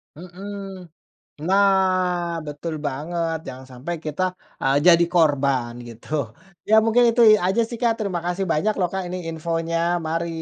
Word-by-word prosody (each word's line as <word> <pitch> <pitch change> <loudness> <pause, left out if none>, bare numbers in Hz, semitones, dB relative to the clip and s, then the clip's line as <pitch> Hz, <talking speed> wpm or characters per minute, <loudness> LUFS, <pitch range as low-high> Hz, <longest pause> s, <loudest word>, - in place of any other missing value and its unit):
Mhm. 190 +1 -9 0.6
Nah, 185 -3 +2
betul 150 +3 -5
banget 165 +4 -3
jangan 130 0 -8
sampai 155 +8 -5
kita, 155 +5 -2 0.4
eee, 135 +1 +2
jadi 170 0 +7
korban 140 -7 +2 0.2
gitu. 115 0 -13 0.6
Ya 220 - +6
mungkin 240 +2 +4
itu 240 +1 +2 0.2
aja 195 +5 +2
sih, 235 - -6
Kak, 235 -1 +3
terima 190 -5 -2
kasih 180 +2 -1
banyak 210 +8 +1
loh, 180 -2 +1
Kak, 190 -1 -2
ini 180 +1 -4
infonya. 165 +1 -2 0.3
Mari! 165 +1 -1
175 Hz, 145 wpm, -22 LUFS, 155-190 Hz, 0.6 s, jadi